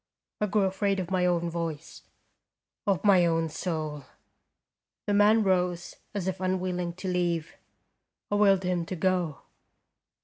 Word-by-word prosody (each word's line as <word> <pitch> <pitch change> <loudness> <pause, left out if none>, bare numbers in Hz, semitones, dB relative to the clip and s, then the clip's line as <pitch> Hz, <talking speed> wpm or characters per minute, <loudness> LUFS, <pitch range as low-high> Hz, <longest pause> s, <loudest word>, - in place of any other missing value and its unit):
I 210 - +1
grew 205 +1 +2
afraid 195 +1 0
of 180 0 -4
my 180 -1 +2
own 170 -1 +1
voice, 165 -2 -5 0.9
of 195 -3 +1
my 195 -4 +6
own 165 -1 +1
soul. 155 -4 -4 1.0
The 205 - 0
man 210 +2 +5
rose 180 -2 0 0.2
as 190 -3 -2
if 190 0 -3
unwilling 180 -2 -1
to 185 +2 -7
leave. 175 -3 -1 0.8
I - - 0
willed 195 -2 +4
him 180 -1 0
to 185 - -4
go. 180 -5 0
180 Hz, 140 wpm, -28 LUFS, 170-190 Hz, 1.0 s, my